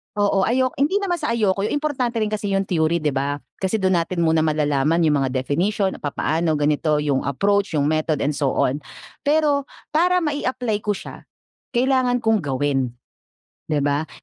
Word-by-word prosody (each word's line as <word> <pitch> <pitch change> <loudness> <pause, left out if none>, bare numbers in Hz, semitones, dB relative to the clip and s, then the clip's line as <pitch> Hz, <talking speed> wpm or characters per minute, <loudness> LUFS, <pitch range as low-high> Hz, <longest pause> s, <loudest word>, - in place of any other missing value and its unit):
Oo. 200 -2 +2
Ayo 255 +2 +2
hindi 295 +7 +2
naman 385 -4 0
sa 300 -7 -1
ayoko, 200 -4 +1
yung - - -1
importante 275 -5 -1
rin 215 - -2
kasi 210 -1 -2
yung 195 - +2
theory, 170 -3 0
di 150 - +2
ba? 140 +1 -1 0.2
Kasi 190 +2 0
dun 190 -4 +2
natin 170 +1 -1
muna 160 0 +3
malalaman 155 +1 +1
yung 150 -3 +3
mga 135 - +1
definition, 170 +10 0
papaano, 155 +2 -1
ganito, 150 0 +1
yung 140 -3 +1
approach, 200 +6 +1
yung 145 - +2
method, 155 0 0
and 145 - +1
so 140 -2 -1
on. 135 +3 +1 0.5
Pero 290 -2 +2 0.2
para 360 +3 +3
mai-apply 255 -7 -1
ko 205 0 -1
siya, - - -10 0.4
kailangan 255 0 +2
kong 220 -4 +1
gawin, 135 -2 0 0.8
di 155 - 0
ba? 145 +2 0
185 Hz, 175 wpm, -22 LUFS, 150-240 Hz, 0.8 s, muna